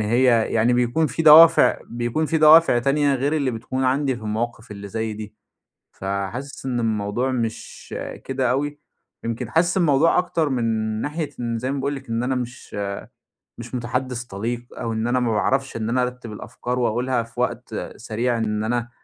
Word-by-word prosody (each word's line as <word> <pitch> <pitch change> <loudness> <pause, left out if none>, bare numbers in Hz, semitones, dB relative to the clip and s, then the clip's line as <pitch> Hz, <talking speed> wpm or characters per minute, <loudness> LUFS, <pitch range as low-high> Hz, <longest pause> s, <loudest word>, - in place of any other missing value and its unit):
هي 115 +1 +3
يعني 115 +2 +3
بيكون 125 +6 +2
في 165 - -3
دوافع 160 +2 +8
بيكون 120 +6 -2
في 160 - +1
دوافع 155 -4 +7
تانية 140 +3 +2
غير 135 +3 0
اللي 140 -4 +1
بتكون 130 +3 -3
عندي 130 0 +1
في 110 - -11
المواقف 110 +1 -3
اللي 100 0 -8
زي 110 +1 -3
دي. 105 0 -8 0.6
فحاسس 100 +9 -5
إن 120 -2 -1
الموضوع 110 +3 -1
مش 115 -3 -5 0.3
كده 130 -2 0
أوي. 145 +3 -1 0.5
يمكن 115 +1 -3
حاسس 175 +5 +2
الموضوع 165 -2 +3
أكتر 165 -4 0
من 125 -3 -1 0.4
ناحية 150 +2 -3
إن 115 -1 -2
زي 130 +3 -3
ما 140 - -2
باقول 140 +2 -1
لِك 135 -2 -9
إن 115 +1 -1
أنا 130 +1 0
مش 125 -3 -6 0.8
مش 120 +2 -7
مُتَحدِّث 125 0 -2
طَليق 120 +3 -4
أو 115 -1 -4
إن 110 +1 -1
أنا 125 +1 +2
ما 120 -2 0
باعرفش 135 +5 0
إن 110 0 -2
أنا 125 +2 +1
أرتّب 125 -2 -5
الأفكار 125 +3 -5
وأقولها 120 +1 0
في 115 +1 -12
وقت 120 -2 -2 0.2
سريع 115 +2 -2
إن 105 -1 -1
أنا 120 +1 -1
125 Hz, 175 wpm, -22 LUFS, 115-135 Hz, 0.8 s, دوافع